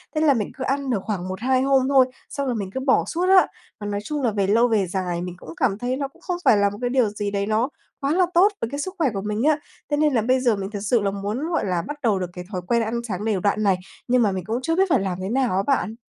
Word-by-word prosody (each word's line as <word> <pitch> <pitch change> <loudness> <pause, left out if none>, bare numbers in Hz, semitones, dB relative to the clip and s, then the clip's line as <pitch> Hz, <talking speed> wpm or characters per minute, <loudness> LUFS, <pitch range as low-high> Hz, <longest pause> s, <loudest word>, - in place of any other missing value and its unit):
Thế 310 - +1
là 305 -3 +5
mình 220 -6 -2
cứ 260 - -4
ăn 275 +1 -1
được 235 -5 +1
khoảng 190 -4 -3
1-2 250 +8 0
hôm 265 -1 +3
thôi, 270 -2 +6 0.2
xong 280 - -3
rồi 250 - 0
mình 200 -4 -3
cứ - - -2
bỏ 265 0 +2
suốt 345 +2 -1
á. - - +9 0.4
Và 205 - -5
nói 205 0 -2
chung 295 +4 -3
là 240 - +1
về 200 -2 0
lâu 230 +4 +4
về 215 -5 +1
dài 180 -1 -2
mình 180 0 -5
cũng 165 - -12
cảm 215 -7 +1
thấy 245 +3 -2
nó 280 0 -2
cũng 270 - -24
không 360 -2 -3
phải 215 - +6
là 200 0 +3
một 205 - -8
cái 245 - 0
điều 250 -4 +2
gì 205 0 -3
đấy 200 0 -1
nó 220 +5 +1 0.3
quá 280 +2 +1
là 365 +1 +4
tốt 360 +4 +6
với 230 - -1
cái 285 +3 -4
sức 370 +5 -3
khỏe 310 -5 +2
của 195 - -3
mình 210 +3 -2
á. 305 +1 +3 0.3
Thế 290 - +2
nên 300 -1 +3
là 230 - +3
bây 255 +4 +2
giờ 245 -4 +2
mình 195 -1 -4
thực 205 - -4
sự 215 +3 +1
là 200 -1 0
muốn, 205 +10 -3
gọi 325 - 0
là, 180 -3 0
bắt 295 0 -6
đầu 215 -5 +2
được 180 -2 -3
cái 180 - -7
thói 185 -3 -3
quen 235 +2 +2
ăn 230 +1 -1
sáng 205 0 -4
đều 215 -4 +1
đặn 205 +3 +1
này, 195 -3 +3 0.3
nhưng 250 0 +3
mà 210 -3 +3
mình 190 -1 -3
cũng 225 +4 -1
chưa 325 +5 0
biết 380 +1 +2
phải 280 - +4
làm 190 -2 -2
thế 190 - -3
nào 250 -4 +1
á 195 - +1
bạn. 245 -5 +1
225 Hz, 315 wpm, -23 LUFS, 200-270 Hz, 0.4 s, á